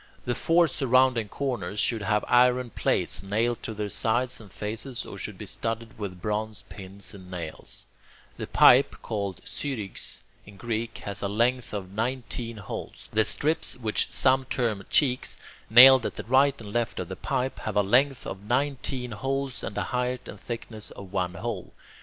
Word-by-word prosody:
The 125 - 0
four 165 +7 +3
surrounding 130 -5 +2
corners 120 -6 -3
should 115 +1 +1
have 105 +1 +1
iron 125 0 +4
plates - - +1
nailed 110 +4 0
to 110 - -5
their 105 0 -2
sides 120 +4 0
and 105 -4 -14
faces, 110 +6 -4
or - - -9
should - - -5
be - - -7
studded 115 0 -4
with 95 -4 -5
bronze 105 +2 -3
pins 100 0 -8
and 95 -2 -12
nails. 85 -4 -7 0.5
The - - -5
pipe, - - +6
called 100 -3 -3
[Greek: - - -17
syrigx] 115 -9 -4 0.2
in 100 -1 -14
Greek, 115 +1 -3
has 100 -1 -3
a 100 - 0
length 120 +4 +1
of 95 -3 -5
nineteen 115 +1 -3
holes. 100 - -7
The 110 0 +4
strips, 155 +6 +1
which 110 -4 0
some 130 0 +3
term 115 -7 -1
cheeks, 130 -4 +2 0.3
nailed 130 +2 +9
at - - -7
the - - -6
right 135 +3 +3
and 105 -2 -9
left 120 -2 -1
of - - -3
the - - -6
pipe, 130 +1 -2
have 110 - -4
a 105 - +5
length 130 +6 +3
of 95 - -6
nineteen 130 0 -1
holes 135 +4 -3
and 105 - -5
a - - +1
height 125 0 -2
and - - -9
thickness 115 -2 -5
of 100 -1 -11
one 90 -2 -1
hole. - - -5
115 Hz, 175 wpm, -27 LUFS, 105-125 Hz, 0.5 s, nailed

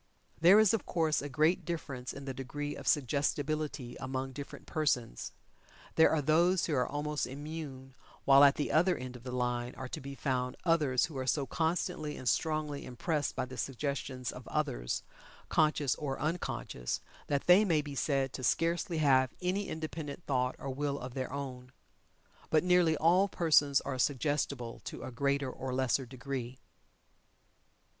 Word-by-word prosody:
There 180 +6 +8
is 220 -2 +5
of 225 - -1
course 160 -3 +1
a 145 - -5
great 155 +5 +2
difference 140 -7 -4
in 140 0 -8
the 135 - -3
degree 145 +3 -4
of - - -9
suggestibility 145 -1 0
among 130 0 -3
different 140 +1 -8
persons. 125 - -1 0.6
There 160 - +6
are 155 -2 +1
those 170 +5 +3
who 160 - -2
are 125 -3 +2
almost 150 +1 -2
immune, 140 -1 -7 0.3
while 140 0 +8
at 140 0 +7
the 145 - -2
other 175 +3 +3
end 125 0 -7
of 125 - -10
the 125 +1 -6
line 125 0 -1
are 130 - -6
to - - -5
be 140 +1 -7
found 125 -2 -1
others 150 -7 +3
who 165 -5 -10
are 130 - -3
so 140 +1 +1
constantly 160 -1 -1
and 130 - -7
strongly 155 0 0
impressed 145 +4 -2
by - - -1
the 130 0 -9
suggestions 135 -2 -3
of - - -10
others, - - -1 0.5
conscious 150 -4 +3
or 135 -3 -4
unconscious, 150 - -2 0.3
that 140 -1 0
they 180 +4 +7
may 165 -7 +2
be 145 -1 -7
said 135 -1 0
to 130 - -6
scarcely 170 +4 +1
have 130 -4 +4
any 190 +3 -1
independent 160 0 -5
thought 125 -2 0
or 135 - -5
will 140 +1 -2
of 125 -2 -7
their 130 -1 -3
own. 130 -2 -6 0.8
But 155 0 +3
nearly 180 -3 +4
all 180 +6 +4
persons 150 -6 +3
are 130 -2 -4
suggestible 140 -3 -1
to - - -6
a - - -6
greater 140 +1 0
or 130 0 -4
lesser 130 0 +1
degree. 130 -1 -5
140 Hz, 165 wpm, -32 LUFS, 130-155 Hz, 0.8 s, There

